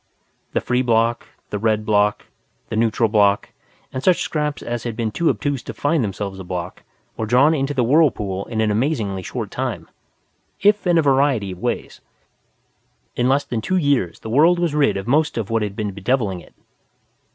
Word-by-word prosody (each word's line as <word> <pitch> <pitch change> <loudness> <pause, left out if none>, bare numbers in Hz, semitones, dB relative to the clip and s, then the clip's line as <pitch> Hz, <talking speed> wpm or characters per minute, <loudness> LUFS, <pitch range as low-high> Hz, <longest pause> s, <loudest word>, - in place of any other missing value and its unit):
The - - +1
Free 125 0 0
Bloc, 115 -1 +1 0.2
the 105 - -2
Red 110 0 +1
Bloc, 105 -1 +2 0.4
the - - -3
Neutral 115 0 +2
Bloc 105 -2 +2 0.4
and 130 - -3
such 185 -2 +3
scraps 150 -2 -2
as 120 -1 -3
had 120 -2 -4
been 110 -1 -2
too 170 +8 +1
obtuse 145 -4 -1
to - - -8
find 145 -1 +1
themselves 100 -1 -4
a - - -6
Bloc 90 0 -5 0.4
were 110 - -2
drawn 130 +7 +4
into 145 -1 -1
the 125 - +2
whirlpool 115 - +2
in 110 -2 -2
an 110 -1 +2
amazingly 105 -5 -1
short - - -5
time, - - -4 0.7
if 205 -1 +3
in 175 -1 +4
a 165 - +4
variety 135 -7 +2
of 90 - -9
ways. - - -3 1.1
In 125 +1 +1
less 140 +2 +3
than 115 -2 -3
two 185 +11 0
years 140 - 0
the 110 - -7
world 160 +8 +5
was 170 -3 0
rid 140 -9 +2
of 95 - -5
most 150 +3 +2
of 115 -1 -3
what 115 -1 +1
had 105 -2 -3
been 105 -1 -3
bedeviling 100 -1 -1
it. - - -18
115 Hz, 190 wpm, -21 LUFS, 105-145 Hz, 1.1 s, world